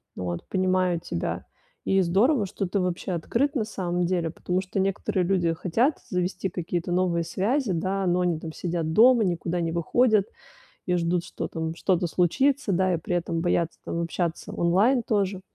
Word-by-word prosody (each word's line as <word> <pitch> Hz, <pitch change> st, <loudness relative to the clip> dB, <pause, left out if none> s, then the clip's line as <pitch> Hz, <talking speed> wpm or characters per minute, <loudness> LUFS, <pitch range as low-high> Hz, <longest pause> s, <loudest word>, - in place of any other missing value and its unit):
Ну, 90 Hz, -, -5 dB
вот 85 Hz, -1 st, -4 dB
понимаю 185 Hz, -2 st, +1 dB
тебя. 175 Hz, -, -4 dB, 0.4 s
И 195 Hz, 0 st, +3 dB
здорово, 205 Hz, -, +3 dB
что 190 Hz, 0 st, -3 dB
ты 195 Hz, +2 st, -1 dB
вообще 180 Hz, +1 st, -2 dB
открыт, 240 Hz, -, 0 dB
на 240 Hz, -, +1 dB
самом 180 Hz, -4 st, -2 dB
деле, 175 Hz, -2 st, 0 dB
потому 180 Hz, +3 st, -2 dB
что 185 Hz, +1 st, -4 dB
некоторые 195 Hz, -1 st, 0 dB
люди 175 Hz, -3 st, +1 dB
хотят 230 Hz, -, +1 dB
завести 180 Hz, +1 st, -1 dB
какие-то 175 Hz, 0 st, -3 dB
новые 175 Hz, -2 st, +1 dB
связи, 210 Hz, -, 0 dB
да, 190 Hz, +3 st, -1 dB
но 180 Hz, 0 st, +2 dB
они 175 Hz, -3 st, 0 dB
там 160 Hz, 0 st, -6 dB
сидят 165 Hz, -2 st, -2 dB
дома, 240 Hz, +2 st, +6 dB
никуда 175 Hz, -1 st, -1 dB
не 165 Hz, -1 st, -1 dB
выходят 210 Hz, +5 st, +2 dB, 0.6 s
и 180 Hz, -1 st, +1 dB
ждут, 170 Hz, 0 st, 0 dB
что -, -, -5 dB
там 160 Hz, 0 st, -4 dB
что-то 180 Hz, -1 st, +1 dB
случится, 260 Hz, -, +1 dB
да, 185 Hz, 0 st, +2 dB
и -, -, +1 dB
при 170 Hz, +2 st, -3 dB
этом 170 Hz, -1 st, -1 dB
боятся 170 Hz, -1 st, 0 dB
там 170 Hz, -, -2 dB
общаться 170 Hz, 0 st, -3 dB
онлайн 205 Hz, +9 st, +3 dB
тоже. 195 Hz, -3 st, 0 dB
180 Hz, 180 wpm, -26 LUFS, 170-195 Hz, 0.6 s, дома